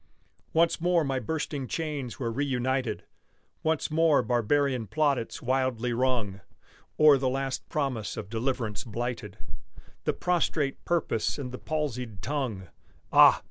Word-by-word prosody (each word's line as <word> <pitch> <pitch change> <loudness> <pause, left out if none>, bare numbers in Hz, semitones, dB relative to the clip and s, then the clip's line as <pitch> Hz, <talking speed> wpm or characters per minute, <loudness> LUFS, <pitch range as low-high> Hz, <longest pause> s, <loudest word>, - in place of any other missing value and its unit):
Once 165 0 +2
more 175 -1 +3
my 135 -2 -1
bursting 145 +1 -3
chains 145 -6 -3
were 120 -3 -2
reunited, 130 -2 -1 0.6
Once 160 -1 0
more 160 -2 +4
barbarian 125 0 +1
plaudits 140 0 0
wildly 125 -2 0
rung 115 -6 0 0.6
O'er 150 -3 +7
the 130 -1 +1
last 135 0 -3
promise 135 -8 -2
of 105 - -5
deliverance 115 -1 -2
blighted, 115 -3 -4 0.7
The - - +2
prostrate 160 -5 0
purpose 165 -10 0
and 130 -4 -5
the 125 - -7
palsied 125 - -3
tongue: 120 - -3 0.4
Ah! - - +8
130 Hz, 125 wpm, -28 LUFS, 115-150 Hz, 0.7 s, Ah